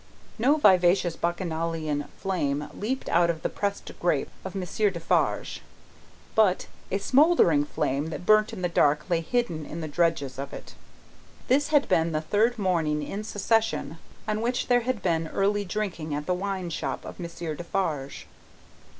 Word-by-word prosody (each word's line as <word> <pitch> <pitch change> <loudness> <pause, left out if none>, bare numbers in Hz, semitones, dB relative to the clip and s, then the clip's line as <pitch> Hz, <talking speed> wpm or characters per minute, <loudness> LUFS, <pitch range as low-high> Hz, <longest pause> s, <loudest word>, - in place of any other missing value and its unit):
No 275 +7 +4
vivacious 180 - +4
Bacchanalian 165 -4 -2
flame 150 -6 -1
leaped 255 +6 -3
out 170 0 +3
of 165 -2 -2
the - - 0
pressed 200 -1 -3
grape 165 -5 0
of 190 0 -7
Monsieur 195 +3 0
Defarge: 170 -3 0 0.7
but, 205 -4 +3 0.2
a 195 - 0
smouldering 250 - +4
fire 145 -2 -1
that 160 +2 -6
burnt 215 +2 +5
in 200 -5 -7
the - - +3
dark, 150 -3 +2
lay 170 -1 +2
hidden 170 -5 -1
in 160 +3 -7
the 160 - -3
dregs 145 -4 0
of 140 0 -5
it. - - -9 0.8
This 285 +3 +3
had 295 -2 +3
been 165 0 +2
the 155 - +1
third 220 +9 +1
morning 165 -7 0
in 200 +8 -5
succession, 215 -7 0 0.3
on 215 0 -1
which 245 +2 -1
there 245 0 +4
had 235 -4 -2
been 165 -2 +1
early 205 +4 +1
drinking 180 -6 -3
at 150 0 -4
the 180 - +1
wine 190 -1 -3
shop - - -3
of - - -9
Monsieur 170 -2 -5
Defarge. 155 -5 -3
175 Hz, 160 wpm, -26 LUFS, 160-210 Hz, 0.8 s, burnt